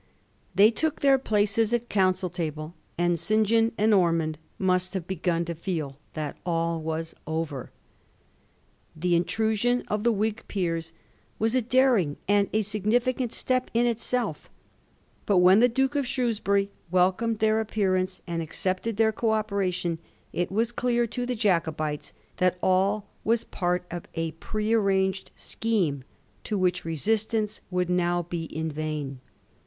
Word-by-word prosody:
They 210 +3 +7
took 315 +5 -1
their 275 -1 +5
places 215 -1 +1
at 240 - 0
the - - -24
Council 185 -4 +1
table, 155 -2 -4 0.2
and 175 -1 +1
St. 215 +4 +2
John 225 +2 +3
and 215 +1 +3
Ormond 165 -5 +2 0.2
must 185 0 +1
have 185 -3 -2
begun 170 -2 -1
to 170 - -3
feel 160 -5 -3 0.2
that 150 -2 -4
all 165 -1 0
was 160 +1 -3
over. 160 -5 -3 1.3
The 175 +2 +1
in 170 +1 +2
trusion 225 +4 +1
of 210 0 -1
the 235 - +4
Whig 215 +1 -1
peers 165 -4 -2 0.4
was 225 +1 +1
a 255 - +3
daring 240 - +3
and 205 0 +3
a 215 0 +1
signifi 215 +5 +1
cant 245 -3 -2
step 255 0 0
in 235 +1 +4
itself, 240 +1 -2 0.8
but 200 - +4
when 180 +3 +7
the 245 +2 +5
Duke 265 +3 +1
of 285 -3 0
Shrewsbury 210 -6 0 0.2
wdcomed 190 +5 +2
their 220 0 +3
appearance 190 -4 0
and 170 -2 -2
accepted 185 +6 -2
their 220 0 +4
co 225 +2 -2
oper 215 -3 +1
ation, 175 -2 -2 0.3
it 175 +1 -1
was 225 +4 +1
dear 240 0 +1
to 245 +2 -3
the 250 - -1
Jacobites 160 -8 0 0.3
that 185 0 +2
all 195 +3 +2 0.2
was 230 +1 +2
part 180 -1 -1
of 175 0 -6
a 165 -1 -1
pre 215 +7 -2
arranged 195 -3 +1
scheme, 180 - -1 0.4
to 210 - -2
which 180 -2 +1
resistance 215 +6 -1
would 180 -1 0
now 175 -1 +1
be 170 -1 -4
in 160 0 -4
vain. 150 -3 -4
195 Hz, 155 wpm, -26 LUFS, 170-225 Hz, 1.3 s, They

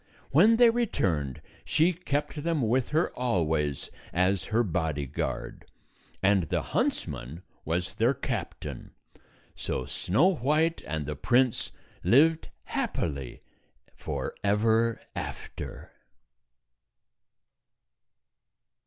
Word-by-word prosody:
When 200 +11 +6
they 235 0 +7
returned, 85 - -1 0.2
she 165 +4 +3
kept 150 -3 -2
them 160 -3 0
with 125 +2 +1
her 160 +3 +1
always 80 - 0 0.2
as 90 +1 +1
her 115 +2 +2
bodyguard, 80 - -3 0.6
and 95 -5 +3
the - - 0
huntsman 75 +9 -2 0.2
was 85 +3 -1
their 120 +5 +2
captain. 120 -8 -5 0.6
So 65 - -3
Snow 150 - +2
White 155 +4 +1
and 75 -1 -2
the 75 +1 -4
prince 120 - +2 0.3
lived 160 +6 +4
happily 70 -6 -3 0.5
forever 110 +2 0 0.2
after. - - -6
110 Hz, 90 wpm, -28 LUFS, -, 0.6 s, they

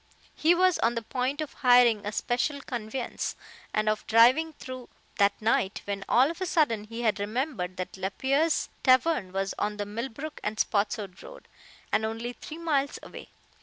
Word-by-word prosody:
He 330 +3 +3
was 370 0 +3
on 235 +1 +2
the 230 - -3
point 255 +5 -2
of 305 - -5
hiring 245 -5 +4
a - - -1
special 245 +6 -1
conveyance, 240 -1 -4 0.4
and 215 0 0
of 215 0 0
driving 255 +9 +5
through 255 -3 -9 0.3
that 200 0 +3
night, 215 -3 0
when 200 -1 -3
all 265 +5 +5
of 335 - -11
a 370 - -1
sudden 235 -12 +1
he 230 +2 -6
had 215 -3 +1
remembered 210 - -3
that 185 +1 -5
Lapierre's 265 - 0
tavern 255 - +3
was 195 +1 -2
on 210 0 -1
the 205 - -2
Millbrook 235 +8 -6
and 215 +1 -3
Spotswood 205 -3 -1
road, - - -12 0.4
and 220 - +2
only 225 +2 -3
three 310 +5 -9
miles 295 -5 0
away. - - -10
235 Hz, 170 wpm, -28 LUFS, 210-280 Hz, 0.4 s, driving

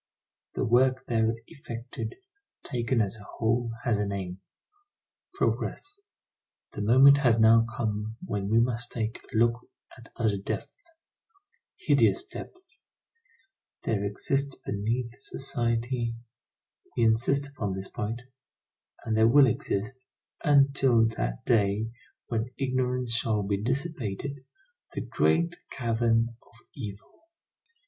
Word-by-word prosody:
The - - 0
work 130 +3 +3
there 115 -1 +1
effected, 120 - -7 0.5
taken 120 -2 0
as 100 +1 -1
a 105 - -12
whole 115 +2 0
has 120 -6 +1
a 105 - +1
name: 95 -2 -4 0.9
Progress. 405 +1 -2 0.7
The - - -4
moment 135 +6 +7
has 120 -5 +4
now 115 +1 +6
come 110 0 -2
when 100 - -2
we 115 +2 +4
must 120 0 0
take 110 -1 -3
a - - -2
look 120 +1 +3 0.4
at 115 -1 -15
other 110 -4 +1
depths, 340 - -6 0.9
hideous 360 - +3
depths. 370 +2 -9 1.0
There 105 -3 0
exists 135 +7 -1
beneath 115 +5 -2
society, 120 -2 -1 0.8
we 120 - +3
insist 120 +5 +2
upon 105 -9 -3
this 95 0 -6
point, 115 +3 -4 0.8
and 110 -2 0
there 110 +1 +5
will 140 +4 +7
exist, 125 +2 -2 0.4
until 135 -5 +4
that - - -3
day 110 0 +2 0.3
when 115 0 -2
ignorance 125 -2 0
shall 110 -2 +1
be 100 0 -1
dissipated, 135 - -3 0.5
the - - -3
great 170 +1 +1
cavern 115 -1 +1
of 110 - -24
evil. 105 - -9
115 Hz, 115 wpm, -28 LUFS, 110-130 Hz, 1.0 s, moment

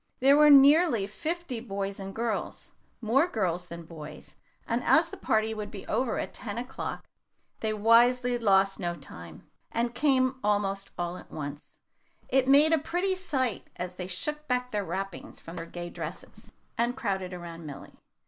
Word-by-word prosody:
There 275 +2 +6
were 300 0 +7
nearly 285 - +7
fifty 310 - -3
boys 200 -3 -4
and 195 0 -7
girls 230 -1 -3 0.3
more 255 +9 +3
girls 180 - -1
than 170 0 -8
boys 160 -2 -10 0.3
and 235 +1 0
as 325 +1 +4
the - - -8
party 220 0 0
would 210 -1 -5
be 200 -3 -9
over 240 +1 0
at - - -4
ten 215 -2 -5
o'clock, 250 +2 -5 0.5
they 220 - -1
wisely 240 +3 +4
lost 195 -3 +3
no 175 -2 -2
time, 85 - -12 0.2
and 235 +1 -1
came 260 -1 +2
almost 200 -1 0
all 175 0 -3
at - - -13
once. 145 0 -7 0.5
It 260 0 +3
made 290 +4 +6
a 320 - +4
pretty 355 +6 -1
sight 265 - -1
as 180 0 -5
they 180 0 -6
shook 300 +12 -4
back 250 0 0
their 210 -1 -1
wrappings 190 +1 -5
from 165 - -10
their 165 - -6
gay 175 0 -7
dresses, - - -8 0.3
and 240 +2 +1
crowded 190 -7 -2
around 170 -2 -8
Milly. 140 - -9
220 Hz, 165 wpm, -28 LUFS, 185-260 Hz, 0.5 s, were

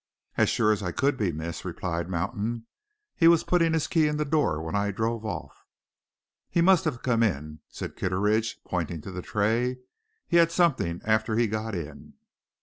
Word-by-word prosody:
"As - - +3
sure 105 - +3
as 105 - 0
I 90 -3 -2
could 140 +9 +1
be, 105 -8 0
miss," 80 +2 -5
replied 85 -1 -3
Mountain. 110 +6 -2 0.5
"He 165 - +5
was 170 -1 +6
putting 165 -2 +2
his 160 -2 +1
key 160 -2 +2
in 150 0 -1
the 150 - 0
door 145 - +1
when 80 +4 -4
I 100 0 +1
drove 115 +2 -2
off." 95 -6 -6 0.9
"He - - 0
must 180 0 +5
have 140 -7 -2
come 115 -3 +2
in," 75 -7 -1
said - - -7
Kitteridge, 105 +4 0
pointing 85 -3 -3
to 95 - -8
the 90 0 -5
tray. 115 +6 0 0.5
"He 170 - +3
had 170 0 +5
something 150 - +1
after 110 0 +1
he 120 +1 +3
got 110 0 -3
in." 75 -4 -8
110 Hz, 185 wpm, -27 LUFS, 90-140 Hz, 0.9 s, was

